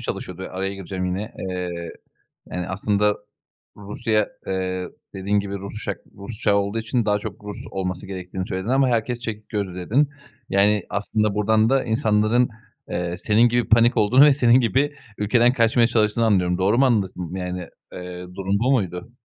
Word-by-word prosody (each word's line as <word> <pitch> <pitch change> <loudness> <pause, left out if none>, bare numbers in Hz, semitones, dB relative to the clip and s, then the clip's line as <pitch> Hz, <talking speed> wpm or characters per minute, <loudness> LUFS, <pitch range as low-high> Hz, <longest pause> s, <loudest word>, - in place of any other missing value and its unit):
çalışıyordu? - - -5
Araya 95 +1 -3
gireceğim 95 -1 -5
yine. 95 +4 -3 0.2
Eee, 90 -2 -4 0.6
yani, 90 -1 -3
aslında 105 +1 +1 0.6
Rusya, 105 +1 0 0.2
eee, 95 -1 -2 0.3
dediğin 100 +2 +1
gibi, 100 0 -4
Rus 100 +2 -7
uçak 100 -4 -3 0.2
Rus 100 +2 -7
uçağı 105 -4 +3
olduğu 100 +3 0
için 110 +1 -1
daha 105 0 +2
çok 105 - -8
Rus 105 -1 -6
olması 90 -2 -3
gerektiğini 95 0 -5
söyledin 95 +2 -4
ama 135 +1 +3
herkes 120 +1 0
çekik 110 -2 -6
gözlü, 95 -4 -3
dedin. 135 +11 +2 0.4
Yani, 100 0 +3
aslında 105 0 0
buradan 110 +1 +3
da 135 0 +3
insanların, 110 0 +2 0.4
eee, 90 0 -2
senin 115 +5 +3
gibi 120 0 0
panik 115 +2 +5
olduğunu 125 +7 +6
ve 145 - +6
senin 125 -2 +5
gibi 135 +5 +1 0.2
ülkeden 120 +4 +3
kaçmaya 115 -1 +3
çalıştığını 110 -1 +2
anlıyorum. 90 -4 +2
Doğru 100 +5 +2
mu 135 - +5
anladım, 95 -7 0
yani, 90 -1 -4 0.3
eee, 90 0 -7
durum 100 +1 -1
bu 125 +4 +2
muydu? 95 -4 -1
105 Hz, 165 wpm, -23 LUFS, 95-115 Hz, 0.6 s, olduğunu